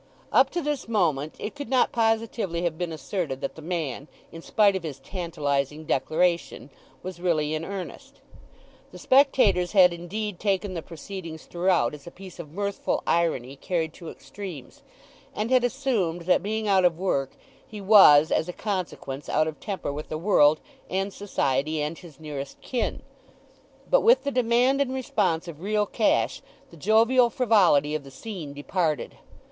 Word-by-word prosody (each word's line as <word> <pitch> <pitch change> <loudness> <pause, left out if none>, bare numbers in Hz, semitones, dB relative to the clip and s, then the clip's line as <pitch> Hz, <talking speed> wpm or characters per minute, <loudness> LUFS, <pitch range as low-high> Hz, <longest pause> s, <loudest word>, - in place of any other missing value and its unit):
Up - - +5
to 345 - -3
this 295 -4 -2
moment 160 -9 0
it 210 - -5
could 285 -1 -7
not 260 -1 +3
positively 225 -6 0
have 170 -2 -1
been 175 0 -4
asserted 160 -3 -4
that - - -3
the 160 - -12
man, 155 -5 -4 0.2
in 165 - -9
spite 200 +2 +3
of 190 - -2
his 155 -5 -6
tantalizing 150 -3 -3
declaration, 160 0 0 0.3
was 185 -2 -7
really 155 -4 0
in 155 +1 -2
earnest. 190 +1 -8 0.7
The - - -11
spectators 255 -10 +3
had 180 -3 +6
indeed 185 +3 -5
taken 200 -1 -1
the 170 - -4
proceedings 165 0 -9
throughout 175 -8 +1
as 145 0 -11
a - - -5
piece 185 0 -13
of 160 -4 -8
mirthful 200 +3 -2
irony 140 -6 0
carried 160 +1 -2
to 170 -3 -9
extremes; 180 -10 -10 0.5
and 220 +4 -2
had 255 -1 +4
assumed 235 -10 -1
that, 180 +2 +2
being 215 +3 -2
out 190 -2 +4
of 175 -2 +3
work, 140 -8 -1 0.3
he 215 - -9
was, 190 -7 +7
as 160 - +1
a - - -4
consequence, 180 -9 -4
out 155 - +2
of 155 - -6
temper 190 -8 -4
with 150 +1 -7
the 155 - -3
world, 155 -4 +4 0.3
and 195 +1 -2
society, 150 -6 -1
and 150 +2 -3
his 160 -6 -14
nearest 145 -3 -7
kin. 250 -3 -3 0.8
But - - +4
with 480 +3 +5
the 280 - -1
demand 250 +2 +2
and 260 -1 -1
response 190 -9 -1
of 160 -2 -9
real 210 +2 +1
cash 215 +1 +1 0.3
the - - -13
jovial 230 - +4
frivolity 200 - +3
of 155 -2 -2
the 135 - -12
scene 155 +1 -8
departed. 155 -1 -2
180 Hz, 165 wpm, -25 LUFS, 155-210 Hz, 0.8 s, was